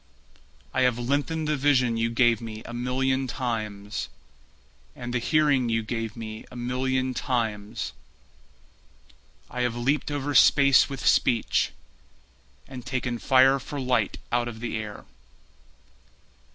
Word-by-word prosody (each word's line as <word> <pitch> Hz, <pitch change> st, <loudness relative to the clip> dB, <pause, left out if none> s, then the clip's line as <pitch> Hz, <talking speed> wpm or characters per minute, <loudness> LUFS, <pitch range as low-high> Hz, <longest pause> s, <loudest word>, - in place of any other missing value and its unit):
I 130 Hz, -, +1 dB
have 125 Hz, -2 st, +3 dB
lengthened 145 Hz, +6 st, -1 dB
the 150 Hz, -, +1 dB
vision 130 Hz, -4 st, +2 dB
you 115 Hz, 0 st, 0 dB
gave 120 Hz, -1 st, +3 dB
me 110 Hz, -1 st, -7 dB
a 120 Hz, -, -8 dB
million 130 Hz, +2 st, 0 dB
times, 110 Hz, -5 st, -4 dB, 0.9 s
And 120 Hz, 0 st, -6 dB
the 125 Hz, -, +1 dB
hearing 140 Hz, -2 st, +2 dB
you 115 Hz, 0 st, 0 dB
gave 115 Hz, -1 st, -4 dB
me 110 Hz, -1 st, -7 dB
a -, -, -13 dB
million 130 Hz, +1 st, -1 dB
times, 110 Hz, -4 st, -2 dB, 1.5 s
I 125 Hz, -, -4 dB
have 125 Hz, -1 st, 0 dB
leaped 135 Hz, +6 st, 0 dB
over 145 Hz, 0 st, -2 dB
space 140 Hz, -1 st, +6 dB
with 135 Hz, -1 st, -6 dB
speech, 115 Hz, -3 st, +3 dB, 1.0 s
And 130 Hz, -2 st, -8 dB
taken 125 Hz, -1 st, -3 dB
fire 135 Hz, +2 st, +5 dB
for 145 Hz, +3 st, -6 dB
light 130 Hz, -1 st, 0 dB
out 120 Hz, 0 st, +1 dB
of 115 Hz, -2 st, -7 dB
the 115 Hz, -1 st, -4 dB
air. 105 Hz, -2 st, -6 dB
125 Hz, 130 wpm, -26 LUFS, 115-130 Hz, 1.5 s, space